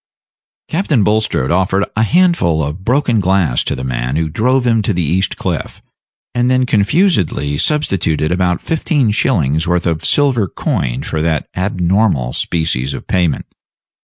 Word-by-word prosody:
Captain 155 - +1
Bulstrode 105 -10 0
offered 95 +3 +1
a 110 - +1
handful 155 - +2
of 75 +6 -5
broken 125 0 +1
glass 95 -8 +1
to - - -2
the 65 - -6
man 65 0 -2
who 80 0 -1
drove 125 +9 +1
him 115 -2 +2
to 105 - -1
the 90 -1 -1
East 90 +5 -1
Cliff, - - -4 0.5
and 120 0 +1
then 130 0 +2
confusedly 100 - +1
substituted 90 - 0
about 90 -1 0
fifteen 150 - 0
shillings 80 - +1
worth 90 -1 0
of 80 -2 -1
silver 130 -8 +2
coin - - -2
for 80 - -3
that 80 -3 -1
abnormal 90 - 0
species 75 -5 -1
of - - -8
payment. 90 -6 0
95 Hz, 150 wpm, -15 LUFS, 80-120 Hz, 0.5 s, handful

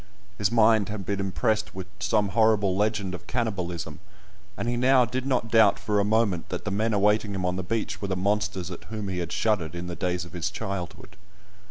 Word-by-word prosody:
His 105 0 +1
mind 110 -3 +4
had 105 -2 -5
been 100 -1 -2
impressed 105 +2 0
with 95 -1 -5
some 100 +1 +1
horrible 105 -2 +3
legend 105 -2 0
of 90 - -8
cannibalism, 90 - -3 0.6
and - - -3
he 120 - 0
now 125 +1 +4
did 130 +3 -3
not 120 -4 0
doubt 110 -3 +6
for 105 -1 0
a - - +3
moment 105 -5 +1
that 90 - -4
the 105 - -2
men 110 +3 +1
awaiting 105 0 +2
him 95 -1 -2
on 90 0 0
the 95 - -2
beach 110 +4 -3
were 100 - -2
the 95 - -1
monsters 95 -2 -1
at 90 - -8
whom 105 -3 -5
he 90 -1 -2
had 85 -1 -4
shuddered 90 -8 0
in 85 0 -5
the 90 -1 -5
days 90 -1 -2
of 85 - -14
his 90 +3 -2
childhood. 95 -2 -6
100 Hz, 215 wpm, -26 LUFS, 90-110 Hz, 0.6 s, doubt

